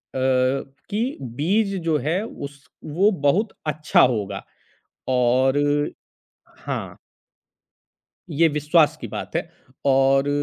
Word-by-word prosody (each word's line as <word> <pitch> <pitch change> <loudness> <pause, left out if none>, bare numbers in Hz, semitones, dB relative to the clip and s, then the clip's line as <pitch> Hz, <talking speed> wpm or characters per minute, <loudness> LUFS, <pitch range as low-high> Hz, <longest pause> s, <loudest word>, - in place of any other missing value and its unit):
कि 135 - -1
बीज 185 - 0
जो 160 -2 +2
है 175 +6 +1
उस 140 -8 -9 0.2
वो 185 +8 +2 0.2
बहुत 200 +9 +2
अच्छा 150 0 +3
होगा 105 -6 +1 0.7
और 130 +2 +3 1.1
हाँ। - - -4 1.3
ये 160 +2 +4
विश्वास 150 +1 +3
की - - -5
बात - - -5
है - - -2 0.4
और 135 +1 +4
145 Hz, 100 wpm, -23 LUFS, 130-170 Hz, 1.3 s, ये